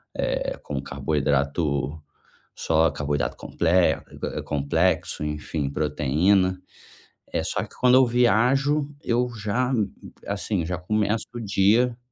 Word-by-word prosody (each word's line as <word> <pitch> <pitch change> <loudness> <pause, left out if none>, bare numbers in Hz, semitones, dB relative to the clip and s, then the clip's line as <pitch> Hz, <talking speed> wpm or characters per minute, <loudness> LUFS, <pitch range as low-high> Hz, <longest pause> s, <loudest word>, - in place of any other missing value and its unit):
eh, - - -2
como 70 -2 -4
carboidrato, 70 +1 -1 0.5
só 80 0 +2
carboidrato 70 0 -2
comple 85 - -2 0.8
complexo, 75 +3 0
enfim, 75 -1 -3
proteína, 80 +6 +1 0.7
eh, - - 0
só - - -2
que - - -12
quando 125 0 +5
eu 130 0 +7
viajo, 130 +5 +3 0.2
eu 120 +1 +1
já 120 +5 -1 0.5
assim, 100 -3 -2
já 90 +1 -3
começo 105 +4 0
o - - -4
dia 110 +4 +2
90 Hz, 110 wpm, -24 LUFS, 75-115 Hz, 0.8 s, eu